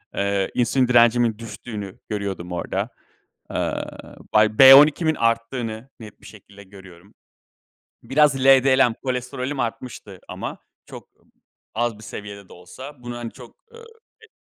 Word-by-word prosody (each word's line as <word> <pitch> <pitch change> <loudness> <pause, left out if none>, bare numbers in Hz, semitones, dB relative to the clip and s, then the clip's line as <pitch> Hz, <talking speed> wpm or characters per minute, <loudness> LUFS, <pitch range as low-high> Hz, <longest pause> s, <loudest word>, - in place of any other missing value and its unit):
Eee, 100 -1 -1
insülin 125 +1 +1
direncimin 120 -2 +3
düştüğünü 110 -3 -8
görüyordum 100 -4 -5
orada. 90 - -3 0.6
Aaa, - - -5 0.2
bay 105 0 +3
B12'imin 150 +4 +7
arttığını 115 0 -2
net 105 -2 -13
bir - - -17
şekilde 100 -1 -15
görüyorum. 95 -1 -16 0.9
Biraz 140 +3 +3
LDL, 135 -2 +5
kolesterolüm 130 +2 -4
artmıştı 115 -5 -6
ama - - -7 0.3
çok - - -12 0.7
az 120 -1 -1
bir 110 - -14
seviyede 100 -2 -9
de - - -13
olsa 125 +10 -12
bunu 120 0 -6
hani 115 -1 -6
çok, 125 -3 -15 0.2
ııı, 465 0 -13 0.4
e - - -16
115 Hz, 125 wpm, -22 LUFS, 100-130 Hz, 0.9 s, B12'imin